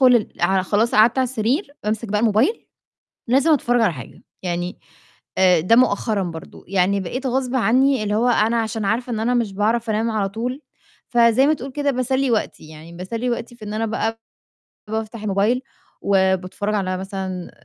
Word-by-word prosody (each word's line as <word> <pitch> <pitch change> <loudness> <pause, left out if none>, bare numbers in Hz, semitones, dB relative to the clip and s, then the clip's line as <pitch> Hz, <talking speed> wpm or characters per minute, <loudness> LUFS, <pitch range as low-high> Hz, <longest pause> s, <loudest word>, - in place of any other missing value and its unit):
ال 225 - +1
ع 190 +2 +3
خلاص 210 +5 +1
قعدت 225 +4 +5
على 260 - +3
السرير 255 - -1
بامسك 215 +2 -2
بقى 210 +1 +1
الموبايل 230 - +1 0.6
لازم 275 +6 +3
أتفرج 245 -4 +2
على 210 -7 +3
حاجة، 130 -5 -11 0.2
يعني 175 0 -3 0.6
آآ 180 -3 +5
ده 205 +8 +3
مؤخرًا 220 -3 +2
برضو، 165 -3 -8
يعني 195 +1 +1
بقيت 255 +9 -4
غصبٍ 260 0 -1
عني 260 +1 +3
اللي 210 0 -1
هو 235 +3 +2
أنا 230 0 +2
عشان 220 -1 -3
عارفة 240 +5 -1
إن 220 - -2
أنا 245 +2 +1
مش 230 -5 0
باعرف 220 +3 0
أنام 220 +2 0
على 205 -3 0
طول، 245 +7 -4 0.5
فزَي 235 +1 +4
ما 310 - +4
تقول 270 -2 -7
كده 285 +1 0
باسلِّي 260 +1 0
وقتي، 215 -8 -2
يعني 155 +2 -12
باسلِّي 225 +8 -4
وقتي 240 0 -4
في 220 - -11
إن 210 0 -5
أنا 225 +1 -1
بقى 225 0 -2 0.7
بافتح 220 0 -4
الموبايل 215 +5 +1 0.4
وباتفرج 190 +1 0
على 185 -2 -1
مثلًا 190 -2 -5
220 Hz, 175 wpm, -21 LUFS, 195-245 Hz, 0.7 s, قعدت